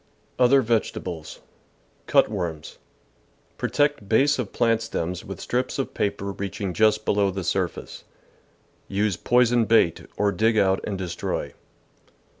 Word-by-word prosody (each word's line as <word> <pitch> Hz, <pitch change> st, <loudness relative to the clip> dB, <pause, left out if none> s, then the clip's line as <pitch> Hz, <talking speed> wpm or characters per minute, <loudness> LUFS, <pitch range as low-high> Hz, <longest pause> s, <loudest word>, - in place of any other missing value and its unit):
Other 130 Hz, +2 st, +5 dB
Vegetables. 95 Hz, -8 st, -3 dB, 0.3 s
— -, -, -38 dB
Cut -, -, +5 dB
worms. 85 Hz, -7 st, -5 dB, 0.4 s
— -, -, -38 dB
Protect 125 Hz, -2 st, 0 dB
base 135 Hz, +5 st, +3 dB
of 115 Hz, -6 st, -3 dB
plant 115 Hz, -2 st, +2 dB
stems 90 Hz, -6 st, -4 dB
with 95 Hz, -, -8 dB
strips 125 Hz, +1 st, -2 dB
of 135 Hz, -, -3 dB
paper 100 Hz, -1 st, -2 dB
reaching 100 Hz, -1 st, -4 dB
just 110 Hz, +2 st, +2 dB
THE -, -, +2 dB
VEGETABLE -, -, +1 dB
GARDEN 100 Hz, 0 st, +2 dB
below 100 Hz, -, +2 dB
the -, -, -4 dB
surface. -, -, -3 dB, 0.8 s
Use 100 Hz, -1 st, 0 dB
poisoned 120 Hz, 0 st, +3 dB
bait, 110 Hz, -7 st, +2 dB
or 100 Hz, 0 st, +2 dB
dig 110 Hz, +4 st, +1 dB
out 95 Hz, -2 st, +3 dB
and 100 Hz, -, -3 dB
destroy. 90 Hz, -2 st, -4 dB
105 Hz, 150 wpm, -24 LUFS, 95-120 Hz, 0.8 s, Other